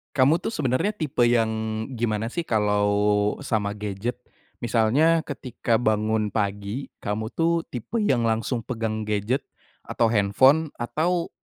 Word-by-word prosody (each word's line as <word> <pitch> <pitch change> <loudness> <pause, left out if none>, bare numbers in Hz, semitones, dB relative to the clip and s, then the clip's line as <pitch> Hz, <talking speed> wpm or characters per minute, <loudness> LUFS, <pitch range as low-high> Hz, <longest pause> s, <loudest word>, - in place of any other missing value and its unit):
Kamu 140 +5 +4
tuh - - -3
sebenarnya 150 - 0
tipe 150 -9 0
yang, 115 -2 +3 0.5
gimana 115 0 -1
sih 170 - -2
kalau 105 -1 +2
sama 105 -6 -1
gadget? 105 +3 -4 0.5
Misalnya 125 +9 +3
ketika 125 -6 -2
bangun 110 -1 +1
pagi, 100 +4 -2
kamu 110 +2 -2
tuh 170 0 +2
tipe 130 - -4
yang 130 - +2
langsung 115 +1 -1
pegang 110 -2 -3
gadget 105 +6 -1 0.4
atau 115 - +1
handphone 130 +9 +3
atau 165 +9 -1
115 Hz, 125 wpm, -24 LUFS, 105-135 Hz, 0.5 s, Kamu